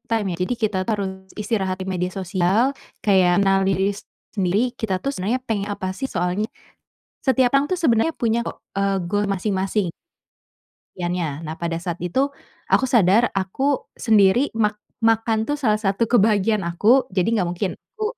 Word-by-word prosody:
time, 220 -3 +1
ya. - - -5
Jadi, 215 +7 0
kita, 215 -3 0
tuh, - - +2
harus 195 -1 -1 0.3
istirahat 195 -4 -1
di 190 - -5
media 180 -1 -1
sosial, 190 +7 +1 0.3
kayak 185 -3 +4
mengenali 195 0 +3
diri 195 +1 +1 0.4
sendiri, 195 +1 +1
kita 195 -4 -2
tuh 275 - -2
sebenarnya 225 +6 -1
pengen 205 -2 -1
apa, 185 -2 -3
sih. 265 +6 -4
Soalnya, 180 +5 -1 0.7
setiap 260 -2 +3
orang, 275 +2 +3
tuh, 370 - +1
sebenarnya 310 -1 +2
punya, 230 0 +1
kok, - - -6 0.2
eee, 195 0 +1
goal 205 +3 0
masing-masing. 195 -1 -1 1.1
Yannya 175 -4 -3
nah, 155 +1 -5
pada 170 -1 -2
saat 175 -1 -4
itu 260 +12 0 0.4
aku - - +4
sadar 225 0 +4
aku 265 +9 0
sendiri 220 +4 +4
mak 210 -1 +1 0.2
makan, 225 -1 +2
tuh, 290 - 0
salah 225 -8 +1
satu 210 +2 0
kebahagiaan 210 -3 +3
aku, 215 +10 +3
jadi, 185 +2 +2
enggak 180 - +1
mungkin 185 +1 -1 0.2
aku 430 -1 -4
205 Hz, 165 wpm, -22 LUFS, 185-230 Hz, 1.1 s, kayak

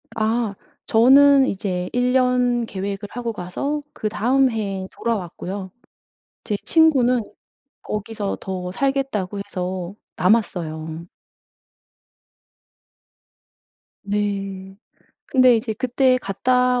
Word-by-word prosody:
아 220 -1 0 0.3
저는 270 +4 +6
이제 185 -2 -2
1 245 0 +1
년 250 -2 +2
계획을 200 0 -5
하고 235 -1 -4
가서 280 +12 -3
그다음 250 +5 +1
해에 195 -4 -3
돌아왔고요. 190 -3 -4 0.7
제 210 - -2
친구는 260 -7 +4 0.6
거기서 210 -1 -4
더 180 -1 -5
살겠다고 265 -6 -1
해서 185 -1 -4 0.2
남았어요. 170 -6 0 3.0
네. 195 -2 -3 0.5
근데 255 -2 +5
이제 220 0 -2
그때 255 +3 +2
갔다 250 +4 +1
215 Hz, 180 characters per minute, -22 LUFS, 190-250 Hz, 3.0 s, 저는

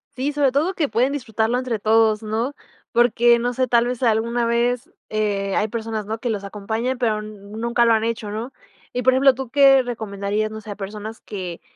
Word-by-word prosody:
Sí, 270 +3 -1
sobre 285 -2 +2
todo 315 +8 0
que 300 -6 0
pueden 255 +4 +2
disfrutarlo 230 -3 -1
entre 250 -4 -2
todos, 220 0 +3
¿no?, 225 +5 -2 0.4
porque 240 0 +4
no 245 +1 -1
sé, 255 +1 0
tal 235 0 +3
vez 250 +1 -3
alguna 235 +1 +1
vez, 245 +6 0 0.2
eh, 205 -2 -1
hay 215 - +1
personas, 220 -2 -4
¿no?, 220 +2 -4
que 245 - -3
los 205 -3 -2
acompañan, 220 +5 -3
pero 215 -3 0
nunca 215 +3 -2
lo 230 - +5
han 220 -1 +2
hecho, 225 -2 -2
¿no? 225 +5 -5 0.4
Y 250 - -1
por 260 +1 +4
ejemplo, 265 +1 +5
¿tú 260 -1 -6
qué 270 0 +6
recomendarías, 215 -3 -3
no 220 0 -7
sé, 210 - -12
a - - -5
personas 210 +2 -7
que 180 -4 -7
230 Hz, 205 wpm, -22 LUFS, 215-250 Hz, 0.4 s, qué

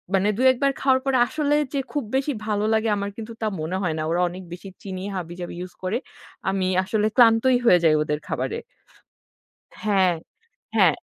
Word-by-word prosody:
মানে 195 +2 +2
২-১ 260 0 +4
বার 275 - +3
খাওয়ার 260 -1 +3
পরে 270 -1 +2
আসলে 295 -1 0 0.2
যে 280 - 0
খুব 290 -4 -1
বেশি 275 +2 +1
ভালো 210 -1 0
লাগে 220 0 +2
আমার 200 0 -2
কিন্তু 225 +1 -7
তা 220 - 0
মনে 175 +4 -2
হয় 160 -3 0
না। - - -1
ওরা 175 +1 +1
অনেক 185 +2 -8
বেশি 185 +2 -9
চিনি 190 -1 -5
হাবিজাবি 175 -1 -6
ইউজ 180 0 -7
করে। 185 +5 0 0.5
আমি 190 -1 0 0.2
আসলে 210 +2 +1
ক্লান্তই 240 +2 +6
হয়ে 180 -6 +6
যাই 155 -1 +5
ওদের 150 0 -2
খাবারে। - - -2 1.2
হ্যাঁ, 190 -4 +3 0.6
হ্যাঁ। - - +5
205 Hz, 180 wpm, -24 LUFS, 185-250 Hz, 1.2 s, ক্লান্তই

